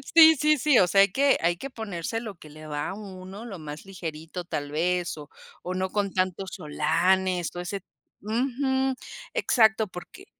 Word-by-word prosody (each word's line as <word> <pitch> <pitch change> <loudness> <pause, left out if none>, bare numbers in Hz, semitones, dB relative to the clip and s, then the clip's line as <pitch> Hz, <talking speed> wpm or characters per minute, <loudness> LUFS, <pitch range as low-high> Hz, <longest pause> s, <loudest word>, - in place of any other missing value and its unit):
Sí, 320 -1 +10
sí, 305 +2 +3
sí, 280 -1 +4
o 180 - +5
sea, 195 +3 +5
hay 200 -2 +4
que 280 +3 +4
hay 170 +1 +2
que 275 - -6
ponerse 220 -3 -4
lo 220 -4 -7
que 155 -3 -14
le 155 +1 -11
va 145 -1 -3
a - - -4
uno, 195 +1 -9
lo 195 -7 -7
más 150 +1 -8
ligerito 170 -2 -6
tal 145 -4 -4
vez, 175 +1 0
o 145 0 -10 0.3
o 180 - -3
no 185 0 -1
con 200 -1 -1
tantos 185 0 -2
olanes, 175 +4 +1
o - - -4
ese 195 +2 -5 0.4
Ujú, 265 +4 0 0.4
exacto, 220 -2 +3
porque 185 - -11
190 Hz, 185 wpm, -26 LUFS, 170-225 Hz, 0.4 s, Sí